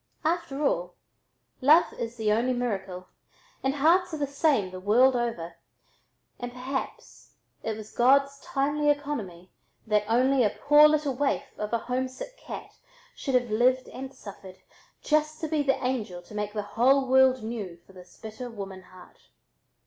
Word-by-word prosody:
After 315 Hz, -4 st, -1 dB
all, 175 Hz, -7 st, -1 dB, 0.7 s
love 305 Hz, +6 st, +5 dB
is 230 Hz, 0 st, -5 dB
the 215 Hz, -2 st, +1 dB
only 240 Hz, +4 st, +2 dB
miracle, 195 Hz, -7 st, -4 dB, 0.5 s
and 270 Hz, +1 st, 0 dB
hearts 335 Hz, +4 st, +3 dB
are -, -, -5 dB
the 290 Hz, -, 0 dB
same 280 Hz, -, +1 dB
the 185 Hz, -, -7 dB
world 245 Hz, +7 st, +4 dB
over, 175 Hz, -9 st, -3 dB, 0.8 s
and 245 Hz, 0 st, -5 dB
perhaps 260 Hz, +2 st, -6 dB, 0.3 s
it 220 Hz, -1 st, -3 dB
was 215 Hz, 0 st, -10 dB
God's 275 Hz, +3 st, +3 dB
timely 290 Hz, +2 st, 0 dB
economy 230 Hz, -12 st, -3 dB, 0.3 s
that 210 Hz, -2 st, +2 dB
only 260 Hz, +3 st, +3 dB
a 210 Hz, -, +3 dB
poor 295 Hz, +1 st, +7 dB
little 300 Hz, -2 st, +1 dB
waif 280 Hz, +2 st, 0 dB, 0.2 s
of 210 Hz, 0 st, -3 dB
a 235 Hz, -, +2 dB
homesick 255 Hz, -, -4 dB
cat -, -, -9 dB, 0.4 s
should 270 Hz, -3 st, -2 dB
have 245 Hz, -3 st, +1 dB
lived 255 Hz, +4 st, +2 dB
and 265 Hz, 0 st, -7 dB
suffered 195 Hz, -7 st, -11 dB, 0.5 s
just 305 Hz, 0 st, +1 dB
to 320 Hz, -, -2 dB
be 305 Hz, -1 st, 0 dB
the 270 Hz, -1 st, +1 dB
angel 210 Hz, -9 st, -3 dB
to -, -, -15 dB
make 210 Hz, 0 st, -3 dB
the 210 Hz, -1 st, -2 dB
whole 265 Hz, +4 st, +4 dB
world 260 Hz, -1 st, +4 dB
new 215 Hz, -6 st, -5 dB
for 195 Hz, -, -19 dB
this 180 Hz, -1 st, -15 dB
bitter 220 Hz, +3 st, -7 dB
woman 195 Hz, -4 st, -8 dB
heart. 185 Hz, 0 st, -18 dB
250 Hz, 160 wpm, -27 LUFS, 210-275 Hz, 0.8 s, poor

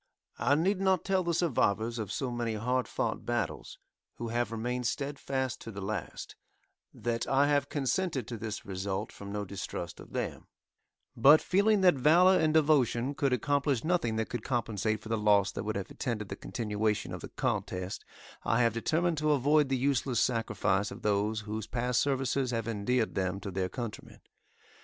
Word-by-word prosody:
I 120 Hz, +6 st, +3 dB
need 185 Hz, +5 st, +1 dB
not 190 Hz, -3 st, +2 dB
tell 190 Hz, -1 st, +2 dB
the 170 Hz, -, 0 dB
survivors 120 Hz, -, +1 dB
of 105 Hz, -3 st, -4 dB
so 130 Hz, -3 st, -2 dB
many 120 Hz, -2 st, -2 dB
hard 125 Hz, +4 st, 0 dB
fought 115 Hz, -, -2 dB
battles, 120 Hz, -7 st, -3 dB, 0.4 s
who 115 Hz, -, -5 dB
have 120 Hz, 0 st, -1 dB
remained 120 Hz, +2 st, -2 dB
steadfast 135 Hz, -2 st, -2 dB
to -, -, -8 dB
the 100 Hz, -, -7 dB
last, 100 Hz, -2 st, -5 dB, 0.6 s
that 115 Hz, -1 st, -2 dB
I 135 Hz, +1 st, +4 dB
have 145 Hz, -1 st, +2 dB
consented 145 Hz, -, -1 dB
to 115 Hz, -, -5 dB
this 110 Hz, 0 st, -5 dB
result 95 Hz, -1 st, -3 dB
from 100 Hz, 0 st, -9 dB
no 105 Hz, 0 st, -3 dB
distrust 90 Hz, -3 st, -6 dB
of -, -, -13 dB
them; -, -, -4 dB, 0.7 s
but, 145 Hz, +7 st, +7 dB
feeling 200 Hz, +2 st, +3 dB
that 180 Hz, -2 st, +6 dB
valor 170 Hz, +8 st, +5 dB
and 155 Hz, -1 st, +3 dB
devotion 145 Hz, -5 st, +3 dB
could 140 Hz, -1 st, 0 dB
accomplish 140 Hz, 0 st, +1 dB
nothing 165 Hz, -9 st, +1 dB
that 110 Hz, 0 st, -1 dB
could 120 Hz, -, -3 dB
compensate 110 Hz, -4 st, -1 dB
for 110 Hz, -, -10 dB
the 115 Hz, -1 st, 0 dB
loss 100 Hz, -2 st, +4 dB
that -, -, -5 dB
would 110 Hz, -, -2 dB
have 100 Hz, -1 st, -4 dB
attended 105 Hz, -5 st, -3 dB
the 100 Hz, -, -4 dB
continuation 105 Hz, -1 st, -2 dB
of -, -, -6 dB
the -, -, -7 dB
contest, 90 Hz, +1 st, -3 dB, 0.4 s
I 120 Hz, +2 st, +2 dB
have 115 Hz, -2 st, +2 dB
determined 160 Hz, +7 st, 0 dB
to 155 Hz, 0 st, +3 dB
avoid 145 Hz, +1 st, +3 dB
the 135 Hz, -, +1 dB
useless 130 Hz, -2 st, +1 dB
sacrifice 105 Hz, -4 st, +1 dB
of -, -, -10 dB
those 105 Hz, +1 st, +1 dB
whose 110 Hz, 0 st, -5 dB
past 125 Hz, 0 st, 0 dB
services 135 Hz, -1 st, 0 dB
have 115 Hz, -2 st, -2 dB
endeared 115 Hz, +2 st, 0 dB
them 95 Hz, 0 st, -1 dB
to 100 Hz, -, -5 dB
their 95 Hz, 0 st, -1 dB
countrymen. 120 Hz, -2 st, -7 dB
120 Hz, 180 wpm, -30 LUFS, 105-140 Hz, 0.7 s, but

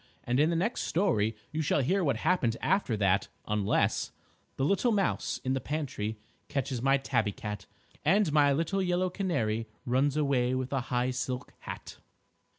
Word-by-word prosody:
And 125 Hz, +2 st, 0 dB
in 155 Hz, +2 st, +4 dB
the 170 Hz, -, +1 dB
next 200 Hz, +9 st, 0 dB
story 135 Hz, -, +1 dB, 0.2 s
you 155 Hz, -, -1 dB
shall 145 Hz, -1 st, +2 dB
hear 190 Hz, +8 st, +2 dB
what 140 Hz, -7 st, +1 dB
happened 125 Hz, -7 st, +1 dB
after 155 Hz, -, +1 dB
that, 100 Hz, -1 st, +2 dB, 0.2 s
unless 105 Hz, -1 st, +1 dB, 0.5 s
_The 135 Hz, -, +1 dB
little 200 Hz, +7 st, +2 dB
mouse 200 Hz, -3 st, 0 dB
in 130 Hz, -, 0 dB
the 135 Hz, -, -1 dB
pantry 125 Hz, -8 st, -3 dB, 0.3 s
Catches 135 Hz, -4 st, -2 dB
my 135 Hz, +2 st, +4 dB
Tabby 110 Hz, -6 st, 0 dB
Cat, 105 Hz, -2 st, -6 dB, 0.4 s
And 190 Hz, +1 st, +3 dB
my 145 Hz, -2 st, +5 dB
little 165 Hz, +7 st, 0 dB
yellow 180 Hz, 0 st, +1 dB
canary 115 Hz, -, -1 dB, 0.2 s
Runs 135 Hz, +3 st, +2 dB
away 130 Hz, -4 st, +2 dB
with 130 Hz, +1 st, -3 dB
a 135 Hz, -, +1 dB
high 125 Hz, +1 st, +1 dB
silk 125 Hz, 0 st, -4 dB
hat. -, -, -8 dB
135 Hz, 165 wpm, -30 LUFS, 120-170 Hz, 0.5 s, my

